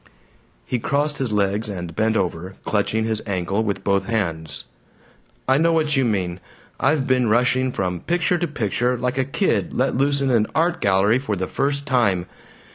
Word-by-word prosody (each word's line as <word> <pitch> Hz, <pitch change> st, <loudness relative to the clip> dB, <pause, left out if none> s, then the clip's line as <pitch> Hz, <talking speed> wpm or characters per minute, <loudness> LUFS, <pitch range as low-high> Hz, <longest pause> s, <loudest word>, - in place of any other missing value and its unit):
He 125 Hz, -, -1 dB
crossed 145 Hz, +4 st, 0 dB
his 130 Hz, -4 st, -1 dB
legs 105 Hz, +1 st, 0 dB
and 90 Hz, -4 st, -6 dB
bent 110 Hz, +2 st, +1 dB
over, 90 Hz, +1 st, -3 dB
clutching 110 Hz, +1 st, 0 dB
his 110 Hz, -1 st, -1 dB
ankle 100 Hz, +1 st, -1 dB
with 100 Hz, -3 st, -2 dB
both 100 Hz, -1 st, +1 dB
hands. 80 Hz, -9 st, -2 dB, 0.8 s
"I 130 Hz, +2 st, +4 dB
know 165 Hz, +1 st, +3 dB
what 155 Hz, -2 st, +1 dB
you 135 Hz, -, +3 dB
mean. 95 Hz, -6 st, -1 dB, 0.4 s
I've 140 Hz, 0 st, +2 dB
been 125 Hz, -4 st, +2 dB
rushing 125 Hz, +3 st, +2 dB
from 90 Hz, -5 st, -2 dB
picture 175 Hz, -, 0 dB
to 175 Hz, -, 0 dB
picture, 125 Hz, -, -1 dB
like 125 Hz, +2 st, -1 dB
a -, -, +3 dB
kid 180 Hz, +9 st, 0 dB
let 130 Hz, +2 st, +1 dB
loose 140 Hz, +2 st, +2 dB
in 135 Hz, -1 st, +1 dB
an 110 Hz, -3 st, +3 dB
art 170 Hz, +2 st, +1 dB
gallery 100 Hz, +5 st, +3 dB
for 120 Hz, -6 st, -2 dB
the 95 Hz, 0 st, -2 dB
first 140 Hz, +6 st, -1 dB
time. 105 Hz, -10 st, +2 dB
115 Hz, 180 wpm, -22 LUFS, 100-135 Hz, 0.8 s, I